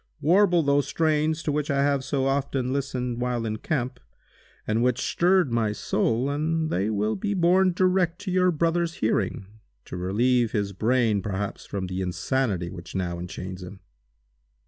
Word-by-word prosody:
Warble 175 Hz, +2 st, +4 dB
those 140 Hz, 0 st, +2 dB
strains 155 Hz, 0 st, +1 dB
to 150 Hz, -, 0 dB
which 150 Hz, 0 st, -1 dB
I 140 Hz, -1 st, +2 dB
have 140 Hz, -2 st, +1 dB
so 135 Hz, 0 st, -1 dB
often 135 Hz, -2 st, 0 dB
listened 125 Hz, -3 st, -2 dB
while 125 Hz, -2 st, -1 dB
in 110 Hz, -1 st, -2 dB
camp, 125 Hz, -1 st, -2 dB, 0.7 s
and 110 Hz, +2 st, 0 dB
which 125 Hz, 0 st, +2 dB
stirred 180 Hz, -3 st, +2 dB
my 110 Hz, -3 st, +1 dB
soul, 115 Hz, +4 st, 0 dB
and 155 Hz, +2 st, -1 dB
they 95 Hz, +4 st, 0 dB
will 105 Hz, 0 st, 0 dB
be 205 Hz, +1 st, -2 dB
borne 185 Hz, +1 st, +4 dB
direct 180 Hz, -1 st, +1 dB
to 200 Hz, -2 st, -4 dB
your 185 Hz, 0 st, +3 dB
brother's 170 Hz, 0 st, 0 dB
hearing, 100 Hz, -3 st, -1 dB, 0.4 s
to -, -, -8 dB
relieve 115 Hz, +6 st, +1 dB
his 100 Hz, -2 st, -1 dB
brain 110 Hz, 0 st, +1 dB
perhaps 100 Hz, 0 st, -4 dB
from 95 Hz, -2 st, -3 dB
the 90 Hz, +1 st, -4 dB
insanity 95 Hz, -1 st, -1 dB
which 85 Hz, -1 st, -10 dB
now 90 Hz, -2 st, -2 dB
enchains 90 Hz, +1 st, -7 dB
him!" 95 Hz, +2 st, -10 dB
130 Hz, 165 wpm, -25 LUFS, 105-160 Hz, 0.7 s, Warble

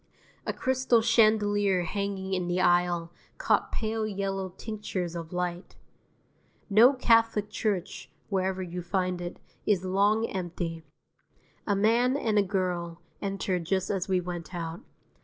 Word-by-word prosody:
A -, -, +2 dB
crystal 260 Hz, -3 st, +2 dB
chandelier 205 Hz, -4 st, +3 dB
hanging 195 Hz, +1 st, -3 dB
in 180 Hz, -2 st, -1 dB
the 175 Hz, +1 st, 0 dB
aisle 175 Hz, -1 st, +2 dB, 0.3 s
caught -, -, +1 dB
pale 220 Hz, 0 st, -1 dB
yellow 195 Hz, -2 st, -2 dB
tinctures 205 Hz, -5 st, -4 dB
of 165 Hz, -1 st, -6 dB
light. 180 Hz, 0 st, -3 dB, 1.0 s
No 230 Hz, +7 st, +7 dB
Catholic 225 Hz, -4 st, +3 dB
church, 200 Hz, -3 st, -2 dB, 0.2 s
wherever 190 Hz, -1 st, -1 dB
you 180 Hz, 0 st, -5 dB
find 180 Hz, 0 st, -1 dB
it, 175 Hz, 0 st, -5 dB, 0.3 s
is 190 Hz, -3 st, +2 dB
long 205 Hz, +4 st, +2 dB
empty; 175 Hz, -4 st, -4 dB, 0.8 s
a 205 Hz, -, +2 dB
man 235 Hz, +6 st, +3 dB
and 220 Hz, -6 st, +1 dB
a -, -, +6 dB
girl 180 Hz, -3 st, -2 dB, 0.2 s
entered 195 Hz, -3 st, -2 dB
just 190 Hz, +2 st, 0 dB
as 190 Hz, -2 st, -1 dB
we 185 Hz, -1 st, +2 dB
went 175 Hz, 0 st, -6 dB
out. 165 Hz, -1 st, -5 dB
190 Hz, 135 wpm, -28 LUFS, 175-210 Hz, 1.0 s, No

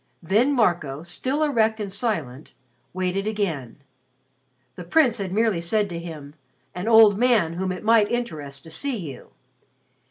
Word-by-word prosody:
Then 220 Hz, -, +2 dB
Marco, 170 Hz, -, 0 dB
still 260 Hz, -, -1 dB
erect 225 Hz, -6 st, +1 dB
and 200 Hz, -3 st, -4 dB
silent, 165 Hz, -, -3 dB, 0.4 s
waited 185 Hz, +2 st, -2 dB
again. 160 Hz, -, -3 dB, 0.9 s
The 180 Hz, -, -8 dB
Prince 240 Hz, -, +2 dB
had 190 Hz, -2 st, -4 dB
merely 215 Hz, -3 st, +1 dB
said 205 Hz, +4 st, 0 dB
to 170 Hz, -1 st, -5 dB
him, 155 Hz, -4 st, -9 dB, 0.4 s
"an 180 Hz, +4 st, -5 dB
old 220 Hz, -3 st, +6 dB
man 230 Hz, -10 st, +3 dB
whom 185 Hz, +2 st, -2 dB
it 180 Hz, -, -6 dB
might 220 Hz, -1 st, +4 dB
interest 150 Hz, -, -4 dB
to 160 Hz, -, -12 dB
see 255 Hz, -, -2 dB
you." 155 Hz, -9 st, -9 dB
195 Hz, 150 wpm, -23 LUFS, 165-225 Hz, 0.9 s, old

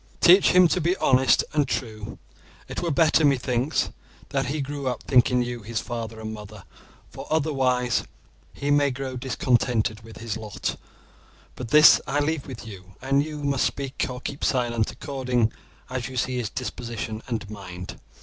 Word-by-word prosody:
Teach 185 Hz, +3 st, +7 dB
him 180 Hz, -1 st, +7 dB
to 180 Hz, -, +1 dB
be 175 Hz, +4 st, +1 dB
honest 130 Hz, 0 st, +4 dB
and 145 Hz, -2 st, +2 dB
true. 110 Hz, -4 st, -4 dB, 0.5 s
It -, -, -5 dB
were 175 Hz, -, -1 dB
better, 160 Hz, +1 st, +3 dB
methinks, 130 Hz, -1 st, +1 dB, 0.4 s
that 135 Hz, -2 st, -1 dB
he 150 Hz, +4 st, -2 dB
grew 140 Hz, 0 st, -4 dB
up 125 Hz, -2 st, -2 dB
thinking 125 Hz, -1 st, +3 dB
you 120 Hz, -1 st, -5 dB
his 110 Hz, +1 st, -3 dB
father 115 Hz, -2 st, -5 dB
and 110 Hz, 0 st, -5 dB
mother, 105 Hz, -2 st, -10 dB, 0.5 s
for -, -, -9 dB
otherwise 130 Hz, -6 st, +1 dB, 0.5 s
he 145 Hz, +1 st, -2 dB
may 145 Hz, 0 st, +4 dB
grow 130 Hz, 0 st, -5 dB
discontented 120 Hz, -4 st, 0 dB
with 115 Hz, 0 st, -12 dB
his 115 Hz, -2 st, -4 dB
lot; 110 Hz, -2 st, -4 dB, 0.8 s
but 125 Hz, -, -6 dB
this 150 Hz, +4 st, +8 dB
I 145 Hz, +2 st, 0 dB
leave 150 Hz, 0 st, -1 dB
with 125 Hz, -4 st, -8 dB
you, 95 Hz, -3 st, -11 dB
and 135 Hz, +2 st, +2 dB
you 150 Hz, -1 st, -6 dB
must 140 Hz, -1 st, +1 dB
speak 135 Hz, -1 st, -2 dB
or 125 Hz, 0 st, -6 dB
keep 140 Hz, +1 st, -6 dB
silent 120 Hz, -4 st, +1 dB
according 125 Hz, -5 st, -1 dB, 0.4 s
as 125 Hz, -2 st, -4 dB
you 130 Hz, -1 st, -7 dB
see 125 Hz, +1 st, 0 dB
his 120 Hz, -4 st, -2 dB
disposition 115 Hz, -2 st, -5 dB
and 115 Hz, -4 st, -3 dB
mind. 90 Hz, -, -8 dB
125 Hz, 170 wpm, -25 LUFS, 115-140 Hz, 0.8 s, this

